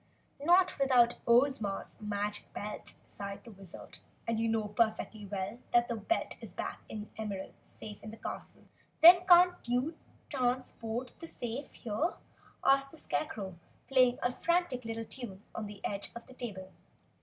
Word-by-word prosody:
"Not 360 Hz, +1 st, +5 dB
without 250 Hz, -3 st, +5 dB
Ozma's 235 Hz, -6 st, +2 dB
magic 210 Hz, 0 st, -3 dB
belt," 210 Hz, +1 st, -6 dB
sighed 200 Hz, 0 st, -7 dB
the 235 Hz, -, -11 dB
Wizard. 195 Hz, -3 st, -11 dB, 0.3 s
"And 230 Hz, -1 st, +1 dB
you 225 Hz, 0 st, +1 dB
know 220 Hz, -2 st, 0 dB
perfectly 215 Hz, -1 st, 0 dB
well 195 Hz, +3 st, -4 dB
that 240 Hz, 0 st, +5 dB
the 235 Hz, -, 0 dB
belt 225 Hz, +11 st, -1 dB
is -, -, -10 dB
back -, -, -4 dB
in 215 Hz, -, -5 dB
the 215 Hz, +1 st, -9 dB
Emerald 200 Hz, -3 st, -4 dB
safe 210 Hz, -1 st, -10 dB
in 215 Hz, -, -8 dB
the 220 Hz, -, -9 dB
castle!" -, -, -7 dB, 0.4 s
"Then 355 Hz, +2 st, +10 dB
can't 360 Hz, 0 st, +8 dB
you 250 Hz, +7 st, 0 dB, 0.3 s
transport 250 Hz, -2 st, -2 dB
the 330 Hz, -, -7 dB
safe 245 Hz, 0 st, -5 dB
here?" 240 Hz, +9 st, -1 dB, 0.5 s
asked 275 Hz, 0 st, +4 dB
the 320 Hz, -, -14 dB
Scarecrow, 205 Hz, -, -3 dB, 0.3 s
playing 255 Hz, -2 st, +5 dB
a 245 Hz, -, +2 dB
frantic 340 Hz, -7 st, 0 dB
little 225 Hz, 0 st, -3 dB
tune 210 Hz, -6 st, -7 dB
on 215 Hz, -, -4 dB
the 205 Hz, -1 st, -8 dB
edge 200 Hz, 0 st, -1 dB
of 235 Hz, -, -8 dB
the 260 Hz, -, -14 dB
table. 195 Hz, -7 st, -6 dB
235 Hz, 160 wpm, -32 LUFS, 210-270 Hz, 0.5 s, Then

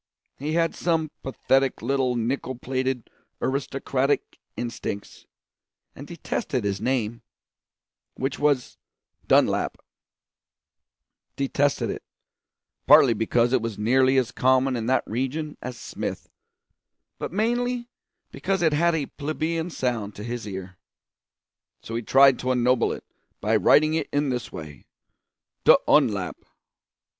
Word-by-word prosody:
He 150 Hz, +3 st, -2 dB
had 165 Hz, 0 st, +2 dB
some 160 Hz, -3 st, 0 dB
pathetic 135 Hz, -1 st, 0 dB
little 130 Hz, 0 st, +1 dB
nickel 130 Hz, +2 st, -2 dB
plated 130 Hz, 0 st, -2 dB, 0.3 s
aristocratic 135 Hz, 0 st, -1 dB, 0.2 s
instincts, 115 Hz, -4 st, -5 dB, 0.7 s
and -, -, -10 dB
detested -, -, -3 dB
his 100 Hz, -1 st, -2 dB
name, 120 Hz, -2 st, -1 dB, 0.9 s
which 135 Hz, +2 st, -3 dB
was 145 Hz, -4 st, 0 dB, 0.5 s
Dunlap; -, -, +3 dB, 1.6 s
detested 140 Hz, +1 st, 0 dB
it, -, -, -6 dB, 0.9 s
partly 125 Hz, -, +8 dB
because 115 Hz, +3 st, +1 dB
it 130 Hz, -, +3 dB
was 115 Hz, -2 st, -4 dB
nearly 130 Hz, +5 st, +3 dB
as 130 Hz, -3 st, +1 dB
common 130 Hz, 0 st, +2 dB
in 115 Hz, -1 st, -3 dB
that 130 Hz, +1 st, +2 dB
region 135 Hz, +6 st, -3 dB
as 125 Hz, -1 st, -6 dB
Smith, -, -, -5 dB, 0.9 s
but -, -, -4 dB
mainly 240 Hz, +4 st, 0 dB, 0.4 s
because 190 Hz, -2 st, -1 dB
it 160 Hz, -2 st, +3 dB
had 170 Hz, +2 st, +3 dB
a 150 Hz, -3 st, -1 dB
plebeian 160 Hz, +4 st, -3 dB
sound 120 Hz, -, -2 dB
to 105 Hz, -, -8 dB
his 120 Hz, -1 st, -5 dB
ear. 95 Hz, -2 st, -7 dB, 1.0 s
So 115 Hz, -, -7 dB
he 115 Hz, -, -1 dB
tried 135 Hz, +2 st, +5 dB
to 130 Hz, -, -1 dB
ennoble 125 Hz, -1 st, +2 dB
it -, -, -6 dB, 0.4 s
by 110 Hz, +2 st, +1 dB
writing 150 Hz, +9 st, +5 dB
it 160 Hz, -, -1 dB
in 145 Hz, 0 st, +1 dB
this 125 Hz, -2 st, -3 dB
way: 75 Hz, -4 st, -10 dB, 0.8 s
d'Unlap. -, -, +4 dB
130 Hz, 120 wpm, -25 LUFS, 120-145 Hz, 1.6 s, partly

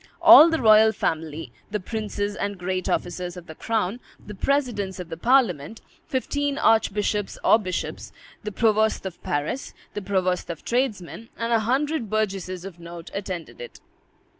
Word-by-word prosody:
All 320 Hz, -, +9 dB
the 325 Hz, -1 st, 0 dB
royal 220 Hz, -1 st, +6 dB
family, 160 Hz, -5 st, -3 dB, 0.2 s
the 210 Hz, -, -2 dB
princes 205 Hz, 0 st, -4 dB
and 200 Hz, -1 st, -3 dB
great 185 Hz, 0 st, -3 dB
officers 180 Hz, 0 st, -3 dB
of 175 Hz, -, -10 dB
the 160 Hz, -, -10 dB
crown, 220 Hz, +4 st, -2 dB, 0.3 s
the 210 Hz, -, -8 dB
presidents 210 Hz, -6 st, -1 dB
of 180 Hz, -2 st, -7 dB
the 165 Hz, -, -5 dB
parliament, 220 Hz, -, +1 dB, 0.3 s
fifteen 285 Hz, 0 st, -1 dB
archbishops 210 Hz, -4 st, +1 dB
or 220 Hz, -, +5 dB
bishops, 185 Hz, -4 st, -5 dB, 0.3 s
the 210 Hz, -, -4 dB
provost 220 Hz, 0 st, +1 dB
of 190 Hz, -3 st, -7 dB
Paris, 145 Hz, -, -3 dB, 0.2 s
the 205 Hz, -, -4 dB
provost 185 Hz, -2 st, -1 dB
of 165 Hz, -2 st, -7 dB
tradesmen, 230 Hz, -4 st, -2 dB
and 230 Hz, 0 st, -1 dB
a 230 Hz, -, +4 dB
hundred 265 Hz, +2 st, -1 dB
burgesses 195 Hz, -4 st, -2 dB
of 180 Hz, -3 st, -9 dB
note 170 Hz, 0 st, -10 dB
attended 190 Hz, -, -6 dB
it. 485 Hz, -, -10 dB
205 Hz, 155 wpm, -24 LUFS, 180-230 Hz, 0.3 s, All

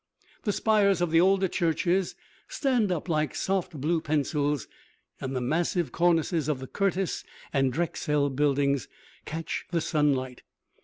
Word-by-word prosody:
The 210 Hz, -, +2 dB
spires 205 Hz, -2 st, +3 dB
of 175 Hz, -2 st, 0 dB
the 165 Hz, +1 st, +5 dB
older 190 Hz, +1 st, +4 dB
churches 175 Hz, +2 st, 0 dB, 0.3 s
stand 245 Hz, -8 st, +1 dB
up 175 Hz, 0 st, -2 dB
like 155 Hz, -3 st, 0 dB
soft 185 Hz, -5 st, -1 dB
blue 160 Hz, +4 st, +1 dB
pencils, 145 Hz, -2 st, 0 dB, 0.5 s
and 135 Hz, 0 st, -4 dB
the 130 Hz, -, -1 dB
massive 165 Hz, +6 st, 0 dB
cornices 165 Hz, -2 st, +2 dB
of 150 Hz, -, +1 dB
the 130 Hz, -, -6 dB
Curtis 195 Hz, +4 st, -1 dB, 0.3 s
and 135 Hz, -2 st, +2 dB
Drexel 150 Hz, -2 st, 0 dB
buildings 140 Hz, -1 st, +1 dB, 0.4 s
catch 165 Hz, +1 st, -4 dB
the 170 Hz, -, 0 dB
sunlight. 145 Hz, -6 st, 0 dB
160 Hz, 140 wpm, -27 LUFS, 145-180 Hz, 0.5 s, the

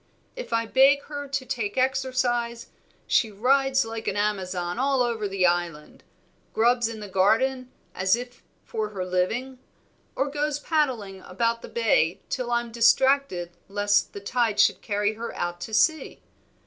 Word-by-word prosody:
If -, -, -8 dB
I 230 Hz, 0 st, +1 dB
beg 275 Hz, +4 st, +4 dB
her 285 Hz, -1 st, -6 dB
to 275 Hz, -1 st, -3 dB
take 220 Hz, -4 st, -3 dB
exercise, 255 Hz, -3 st, 0 dB, 0.4 s
she 225 Hz, -, +2 dB
rides 265 Hz, +5 st, +2 dB
like 225 Hz, 0 st, -6 dB
an 195 Hz, -, -1 dB
Amazon 185 Hz, -3 st, -2 dB
all 270 Hz, -1 st, +2 dB
over 230 Hz, -3 st, -2 dB
the 195 Hz, -2 st, 0 dB
Island, 175 Hz, -3 st, -2 dB, 0.5 s
grubs 235 Hz, +1 st, +3 dB
in 220 Hz, -2 st, -7 dB
the 205 Hz, -, -7 dB
garden 245 Hz, +7 st, +1 dB, 0.2 s
as 190 Hz, +2 st, +2 dB
if 245 Hz, +1 st, -9 dB, 0.2 s
for 215 Hz, -1 st, -3 dB
her 190 Hz, -3 st, -5 dB
living, 220 Hz, +9 st, -2 dB, 0.6 s
or 275 Hz, -, 0 dB
goes 295 Hz, 0 st, -1 dB
paddling 255 Hz, -, -1 dB
about 230 Hz, +6 st, -1 dB
the -, -, -10 dB
bay 205 Hz, -7 st, +1 dB
till 250 Hz, -2 st, -3 dB
I'm 240 Hz, -1 st, -1 dB
distracted 235 Hz, -5 st, +2 dB, 0.2 s
lest 205 Hz, 0 st, +1 dB
the -, -, -6 dB
tide 225 Hz, 0 st, 0 dB
should -, -, +4 dB
carry 205 Hz, 0 st, -1 dB
her 230 Hz, +2 st, -7 dB
out 175 Hz, 0 st, -4 dB
to 200 Hz, -, -6 dB
sea. 315 Hz, +6 st, +1 dB
230 Hz, 155 wpm, -25 LUFS, 200-260 Hz, 0.6 s, beg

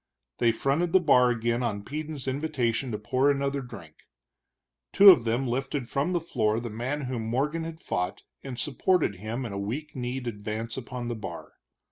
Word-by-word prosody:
They 120 Hz, -1 st, +4 dB
fronted 145 Hz, +9 st, 0 dB
the 190 Hz, -, +7 dB
bar 125 Hz, -7 st, +5 dB
again 120 Hz, 0 st, 0 dB
on 105 Hz, -4 st, -2 dB
Peden's 150 Hz, +1 st, -5 dB
invitation 130 Hz, -4 st, -1 dB
to 105 Hz, -, -2 dB
pour 130 Hz, +6 st, +1 dB
another 140 Hz, 0 st, 0 dB
drink. 85 Hz, -11 st, -12 dB, 0.8 s
Two 200 Hz, 0 st, +10 dB
of 135 Hz, -10 st, +3 dB
them 120 Hz, +4 st, 0 dB
lifted 135 Hz, +1 st, -2 dB
from 140 Hz, +7 st, 0 dB
the 175 Hz, -, +1 dB
floor 115 Hz, -9 st, 0 dB
the 120 Hz, -1 st, -5 dB
man 125 Hz, +7 st, -3 dB
whom 125 Hz, -3 st, -3 dB
Morgan 150 Hz, +8 st, -1 dB
had 165 Hz, -1 st, -7 dB
fought, 90 Hz, -, -3 dB, 0.2 s
and 130 Hz, -3 st, -6 dB
supported 150 Hz, -, +1 dB
him 110 Hz, +6 st, -4 dB
in 110 Hz, -, -5 dB
a 100 Hz, -, -3 dB
weak 140 Hz, +11 st, -4 dB
kneed 125 Hz, 0 st, -3 dB
advance 110 Hz, +1 st, -4 dB
upon 125 Hz, -1 st, -5 dB
the 120 Hz, -, -2 dB
bar. 105 Hz, -3 st, -7 dB
125 Hz, 180 wpm, -27 LUFS, 115-145 Hz, 0.8 s, Two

